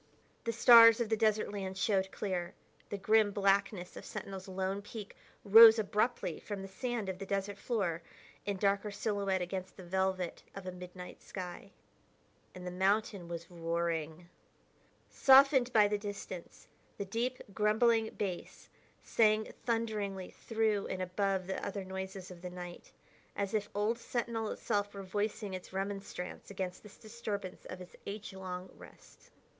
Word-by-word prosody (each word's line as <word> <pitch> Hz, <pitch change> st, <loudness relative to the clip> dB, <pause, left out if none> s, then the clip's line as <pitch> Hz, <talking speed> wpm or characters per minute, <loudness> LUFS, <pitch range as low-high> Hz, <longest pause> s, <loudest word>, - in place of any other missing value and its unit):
The 230 Hz, -, +1 dB
stars 230 Hz, 0 st, +9 dB
of 235 Hz, -2 st, 0 dB
the 220 Hz, -, +3 dB
desert 215 Hz, -1 st, +2 dB
land 190 Hz, -2 st, -4 dB
showed 190 Hz, -1 st, +1 dB
clear; 180 Hz, -4 st, -3 dB, 0.3 s
the 205 Hz, -, -3 dB
grim 215 Hz, +2 st, +4 dB
blackness 195 Hz, -2 st, +1 dB
of -, -, -8 dB
Sentinel's 195 Hz, -1 st, -7 dB
lone 190 Hz, +1 st, -2 dB
peak 205 Hz, 0 st, -9 dB, 0.3 s
rose 225 Hz, +2 st, +10 dB
abruptly 210 Hz, -4 st, 0 dB
from 205 Hz, -2 st, -6 dB
the -, -, -6 dB
sand 225 Hz, +2 st, -3 dB
of 190 Hz, -1 st, -4 dB
the 195 Hz, -, -5 dB
desert 200 Hz, 0 st, -2 dB
floor 190 Hz, -9 st, -1 dB, 0.4 s
in 200 Hz, -1 st, -2 dB
darker 200 Hz, +1 st, +1 dB
silhouette 200 Hz, -2 st, -1 dB
against 185 Hz, +1 st, -5 dB
the 190 Hz, -, -9 dB
velvet 190 Hz, 0 st, -1 dB
of 195 Hz, -1 st, -7 dB
a 185 Hz, -, -3 dB
midnight 180 Hz, 0 st, -9 dB
sky. 185 Hz, +1 st, -7 dB, 0.9 s
And 180 Hz, 0 st, -8 dB
the 180 Hz, -, -4 dB
mountain 195 Hz, 0 st, +1 dB
was 170 Hz, +1 st, -7 dB
roaring. 165 Hz, -1 st, -2 dB, 0.8 s
Softened 265 Hz, -2 st, +6 dB
by 215 Hz, -3 st, +6 dB
the 205 Hz, 0 st, -1 dB
distance, 200 Hz, -4 st, -7 dB, 0.3 s
the 200 Hz, -, -3 dB
deep, 240 Hz, +6 st, -2 dB
grumbling 220 Hz, +2 st, +3 dB
bass 185 Hz, -4 st, -5 dB, 0.3 s
sang 215 Hz, -1 st, +2 dB
thunderingly 210 Hz, -5 st, -1 dB
through 220 Hz, -3 st, 0 dB
and 185 Hz, 0 st, -3 dB
above 190 Hz, 0 st, 0 dB
the 190 Hz, -, -4 dB
other 200 Hz, -1 st, -4 dB
noises 190 Hz, 0 st, -6 dB
of 175 Hz, -1 st, -11 dB
the 180 Hz, -, -5 dB
night, 175 Hz, -1 st, -9 dB, 0.4 s
as 200 Hz, 0 st, -2 dB
if 210 Hz, -1 st, 0 dB
old 215 Hz, +3 st, +1 dB
Sentinel 230 Hz, -2 st, -2 dB
itself 205 Hz, -2 st, -1 dB
were 200 Hz, -, -6 dB
voicing 205 Hz, +1 st, -2 dB
its 185 Hz, -1 st, -7 dB
remonstrance 195 Hz, -1 st, -5 dB
against 185 Hz, -2 st, -4 dB
this 210 Hz, -1 st, -14 dB
disturbance 215 Hz, -4 st, -6 dB
of 185 Hz, -, -7 dB
its 180 Hz, -1 st, -11 dB
age 200 Hz, 0 st, -6 dB
long 185 Hz, -1 st, -6 dB
rest. -, -, -16 dB
200 Hz, 150 wpm, -33 LUFS, 185-215 Hz, 0.9 s, rose